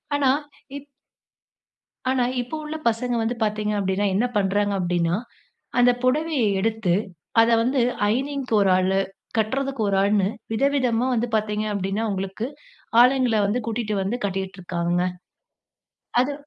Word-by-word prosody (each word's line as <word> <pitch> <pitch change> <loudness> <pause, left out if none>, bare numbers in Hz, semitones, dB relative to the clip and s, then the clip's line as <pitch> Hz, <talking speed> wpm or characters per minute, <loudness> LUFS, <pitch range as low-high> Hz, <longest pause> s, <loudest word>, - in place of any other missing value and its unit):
ஆனா, 280 -2 +3 0.5
இப் 285 - -11 1.2
ஆனா 255 -2 +2 0.2
இப்ப 245 +6 -5
உள்ள 310 +1 -4
பசங்க 240 +2 -1
வந்து 235 +2 -1
பாத்தீங்க 210 0 -1
அப்பிடின்னா, 195 +1 0
என்ன 230 +5 +2
பண்றாங்க 205 +1 +1
அப்பிடின்னா, 175 -1 +1 0.6
அந்த 245 0 +6
புடவைய 295 0 +1 0.2
எடுத்து 220 -4 0 0.5
அத 230 - +4
வந்து 255 +2 +1 0.3
அயர்னிங்க்கு 265 +2 -1
ஒரு 195 - +3
ஆளு, 190 +1 +2 0.4
கட்றதுக்கு 265 +3 -1
ஒரு 195 - +1
ஆள்னு 200 -1 +2 0.3
விதவிதமா 255 -2 +1
வந்து 235 +2 0
பாத்தீங்க 210 0 -1
அப்பிடின்னா, 200 +3 -1
உங்களுக்கு 195 +4 -3 0.5
ஆளுங்கள 250 -2 +4
வந்து 235 +5 0
கூட்டிட்டு 220 -2 -2
வந்து 225 +6 -2
கட்டிக்கிட்டு 190 -1 -4
இருக்காங்கங்க. 175 0 -1 1.2
அது 275 +3 +1
220 Hz, 130 wpm, -23 LUFS, 195-250 Hz, 1.2 s, அந்த